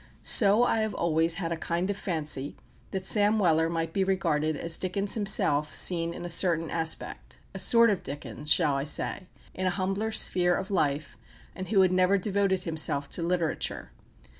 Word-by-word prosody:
So 210 +2 +4
I 225 - +1
have 220 -1 -2
always 165 0 +1
had 170 -2 -4
a - - -1
kind 170 +2 -3
of - - -4
fancy 155 -7 -2 0.3
that 190 -1 -5
Sam 210 +1 +2
Weller 165 -5 +2
might 165 -1 -3
be 195 - +1
regarded 160 -5 -1
as 165 +2 -2
Dickens 195 +2 -1
himself 155 -8 +2
seen 170 -2 +2
in 175 +1 -8
a - - -4
certain 165 -2 +2
aspect 165 -1 -4 0.2
a - - -7
sort 230 -1 +4
of 195 - -2
Dickens, 145 +2 -5
shall 155 -5 +3
I 135 0 -1
say? 180 +4 -1 0.3
in 185 0 -3
an 180 - 0
humbler 195 +4 -2
sphere 180 -4 +2
of 190 +1 -5
life, 150 -5 -2 0.3
and 185 0 -7
who 200 -3 +3
had 185 -1 +3
never 185 +2 +2
devoted 195 -1 -1
himself 155 -4 -1
to - - -2
literature. 170 - -3
175 Hz, 185 wpm, -27 LUFS, 160-195 Hz, 0.3 s, So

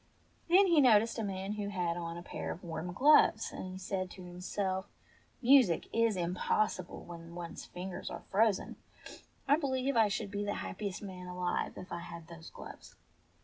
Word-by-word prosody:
Then 380 +4 +7
he 335 -5 +5
noticed 230 -2 +5
a - - -1
man 195 -1 -3
who 210 -1 -3
had 175 -4 -1
on 170 -1 -4
a 175 - -7
pair - - -5
of 180 - -8
warm 170 +1 -4
gloves, 290 +11 +5
and - - -6
he 185 0 -7
said 185 0 -3
to 185 - -10
himself, 185 +2 -3 0.6
"Music 245 -9 +5
is 230 -2 +3
impossible 180 +2 -1
when 170 -1 -10
one's 170 -1 -7
fin 185 +2 -6
gers - - -5
are - - -7
frozen. 210 0 +2 0.7
I 285 +2 +5
believe 275 -2 0
I 225 -2 +5
should 205 0 -3
be 205 0 -2
the 205 0 -2
happiest 200 0 -5
man 185 -2 -7
alive 180 0 -2
if 185 - -9
I 170 - -3
had 170 -1 -9
those 165 -1 -10
gloves." - - -11
190 Hz, 185 wpm, -33 LUFS, 175-220 Hz, 0.7 s, Then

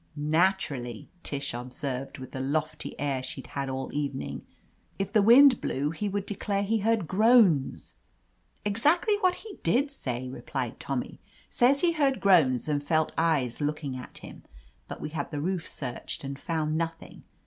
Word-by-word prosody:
"Naturally," 150 - 0
Tish 140 -4 -3
observed, 125 +2 -5
with 130 -1 -9
the 130 - -5
lofty 155 +3 -2
air 140 -2 -1
she'd 130 +1 -7
had 140 -1 -4
all 130 0 -4
evening. 75 - -3 0.6
"If 195 +1 -3
the 215 - +5
wind 250 +4 +7
blew 145 +3 -1
he 205 +5 -3
would 200 0 -2
declare 200 0 -2
he 220 +2 +1
heard 215 -4 +1
groans." 205 - +4 0.7
"Exactly 300 - +3
what 370 -2 +3
he 420 -4 -10
did 260 - +2
say," 130 - -4
replied 125 - -4
Tommy. - - -4 0.3
"Says 270 +3 +4
he 350 - +4
heard 280 -5 +1
groans 155 - +4
and 145 -1 0
felt 155 +2 +1
eyes 150 -7 +1
looking 145 -2 -2
at 125 - -9
him. - - -11 0.5
But - - -7
we - - -4
had 150 -2 -4
the 150 - -4
roof 175 +2 -2
searched, 125 0 -5
and 140 0 -5
found 155 -1 -1
nothing. 165 0 -4
155 Hz, 160 wpm, -28 LUFS, 135-205 Hz, 0.7 s, wind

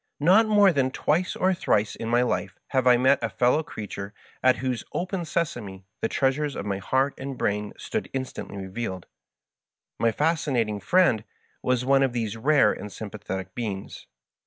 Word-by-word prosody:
Not 190 +9 +5
more 205 -3 +5
than 135 -3 +2
twice 160 +6 0
or 190 +1 +2
thrice 105 - +1
in 115 - -5
my 120 +1 +3
life 95 -6 -2
have 130 -2 +1
I 125 -1 +7
met 130 +2 +3
a 115 - -1
fellow 125 +8 +2
creature 105 - -7 0.3
at 130 0 +5
whose 130 -2 -2
" - - -28
Open 180 -1 -2
Sesame" 110 - -3 0.2
the - - +1
treasures 140 +3 0
of - - -4
my 100 -1 -2
heart 135 +7 +1
and 135 -1 -5
brain 105 -1 -1
stood - - -4
instantly 130 -6 -5
revealed. 95 -1 -5 0.9
My 115 - +3
Fascinating 130 -8 0
Friend 120 - +3 0.4
was 125 -1 0
one 135 +1 +4
of 135 -3 +2
these 115 -3 -2
rare 145 +6 +4
and 105 - -8
sympathetic 100 -2 -6
beings. 105 -5 -5
125 Hz, 170 wpm, -26 LUFS, 105-145 Hz, 0.9 s, I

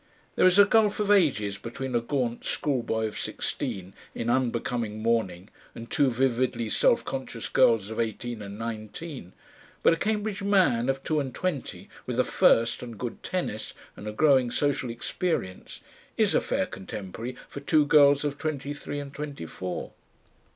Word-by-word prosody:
There - - +5
is 185 +1 +4
a 205 - +9
gulf 210 0 +3
of 205 -1 +1
ages 130 - +3
between 125 +2 -5
a 120 - +2
gaunt 120 -1 -2
schoolboy 120 -6 0
of 110 - -4
sixteen 95 0 -3 0.2
in 115 +1 -1
unbecoming 120 -3 -1
mourning 105 -5 0 0.2
and 115 0 -9
two 140 -2 +3
vividly 125 -2 0
self - - +3
conscious - - -4
girls 110 -2 +3
of 110 - -5
eighteen 115 0 -3
and 100 0 -7
nineteen, 115 - -6 0.5
but - - +6
a - - -1
Cambridge 210 +1 -1
"man" 185 - +3
of 135 0 -1
two 155 -1 +1
and 135 -3 -4
twenty 180 -8 -3 0.2
with - - -2
a - - +5
first 115 0 +3
and 120 -3 -8
good 120 +2 -5
tennis 175 - -3 0.2
and 105 - -9
a - - -2
growing 130 +1 +4
social 135 0 0
experience, 115 - -3 0.4
is - - +3
a - - +3
fair - - 0
contemporary 100 +5 -7
for - - -7
two 150 +1 +3
girls 145 -1 +5
of 145 -1 -3
twenty 145 -2 -3
three 145 0 -5
and 140 -1 -7
twenty 145 - -6
four. 90 +2 -5
125 Hz, 165 wpm, -27 LUFS, 110-145 Hz, 0.5 s, a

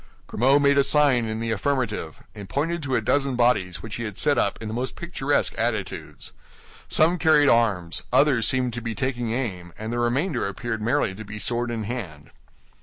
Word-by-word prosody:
Grimaud 135 +5 +3
made 140 0 +4
a - - +5
sign 140 -5 +3
in 110 0 -3
the 115 0 -2
affirmative, 110 - -2
and 100 -2 -10
pointed 165 +4 -1
to 135 -3 -1
a 115 - +1
dozen 135 +3 +1
bodies 95 -9 +1
which 110 - -6
he 115 - -4
had 105 -3 -6
set 145 - +3
up 100 - 0
in 110 - -6
the 110 - -5
most 125 +3 -3
picturesque 145 -5 -1
attitudes. - - -3 0.6
Some 170 +3 +3
carried 150 -3 +5
arms, 100 -8 +2
others 130 -3 +4
seemed 125 -2 0
to 120 - -4
be 115 -1 -4
taking 120 0 -2
aim, 95 -9 -4
and 110 +2 -5
the 120 - -1
remainder 120 - 0
appeared 110 +3 -4
merely 120 -2 +1
to 110 +3 -8
be 105 0 -8
sword 120 +3 -1
in 115 -2 -3
hand. 100 - -6
120 Hz, 195 wpm, -24 LUFS, 110-140 Hz, 0.6 s, a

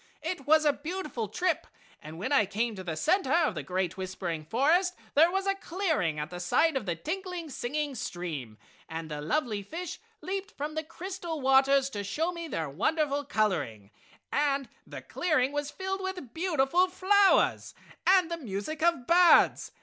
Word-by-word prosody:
It 320 -4 -4
was 310 0 +5
a 295 - +4
beautiful 300 - -4
trip 360 - -1 0.3
and 155 +1 -9
when 215 +11 -3
I 245 -8 +4
came 230 +4 -1
to 190 -2 -7
the 165 -3 -4
center 270 - +1
of 335 - +3
the 155 - -4
great 180 +4 -2
whispering 185 -4 -4
forest 320 - +2 0.2
there 320 +4 +6
was 385 +2 -1
a 390 - +2
clearing 330 - -1
at 150 +2 -4
the 175 - -6
side 285 - +2
of 240 -7 -2
the 170 - 0
tinkling, 350 - -5
singing 290 +4 -2
stream, 160 - -5 0.3
and 160 -1 -6
the 150 0 -4
lovely 210 - -1
fish 330 - -6 0.2
leaped 385 +4 -4
from 295 +2 -3
the 315 0 -2
crystal 340 0 -6
waters 270 -1 +3
and 205 - -2
showed 320 - -1
me 335 -1 -6
their 160 - -3
wonderful 285 - 0
coloring, 150 - -1 0.4
and 280 -2 +1 0.2
the - - -8
clearing 300 -7 +1
was 290 0 -2
filled 385 +3 -4
with 365 -10 -5
beautiful 340 0 +2
flowers 385 +2 +3 0.3
and 365 -2 +5
the 335 - -1
music 250 +3 -5
of 335 -7 +2
birds. 350 +3 +5
290 Hz, 175 wpm, -29 LUFS, -, 0.4 s, there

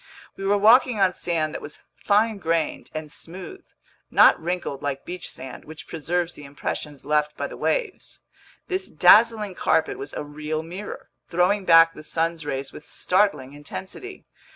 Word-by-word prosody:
We 195 - -6
were 205 +1 +3
walking 230 +2 +5
on 190 -2 +3
sand 160 -4 -1
that - - -5
was 145 - -10
fine 215 +1 +1
grained 165 -3 -1
and 155 -1 -5
smooth, 185 - -9 0.5
not - - +6
wrinkled 170 -5 -3
like 140 -2 -3
beach 180 0 -6
sand, 130 -1 -9
which 155 +1 -11
preserves 175 +2 -2
the 150 - -11
impressions 145 0 -5
left 150 0 0
by - - -2
the - - -7
waves. - - -2 0.5
This 380 0 -2
dazzling 210 +4 +5
carpet 405 - +1
was 405 - -6
a - - -4
real 155 +2 -4
mirror, 185 +5 -8 0.2
throwing 185 +3 +2
back 165 -1 +7
the - - -11
sun's 165 0 -2
rays 135 -1 -4
with 150 - -12
startling 180 -9 0
intensity. 190 - -9
170 Hz, 160 wpm, -24 LUFS, 150-205 Hz, 0.5 s, back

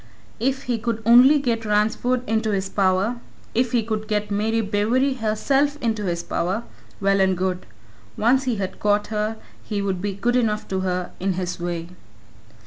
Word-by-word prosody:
If 265 +3 0
he 240 -2 -1
could 230 0 -2
only 250 +6 +7
get 235 -5 -1
Ransford 220 +4 +1
into 220 0 0
his 195 -2 -1
power 195 +4 +1 0.4
if 245 0 +1
he 235 -2 +2
could 215 -1 -3
get 210 -1 -1
Mary 220 +3 +1
Bewery 225 +6 +1
herself 275 +7 +1
into 220 -4 -1
his 170 -1 -2
power 190 +7 -2 0.4
well 195 0 +2
and 190 -1 +2
good. 185 0 -2 0.5
Once 260 +5 +3
he 250 -3 0
had 190 -2 -4
got 205 0 +1
her, 215 +1 -1 0.3
he 210 -2 -3
would 195 -2 -2
be 205 0 -2
good 240 +5 0
enough 215 -4 0
to 190 - -1
her 180 -1 -2
in 190 +1 0
his 180 -1 -3
way. 170 -1 -4
215 Hz, 175 wpm, -23 LUFS, 195-235 Hz, 0.5 s, only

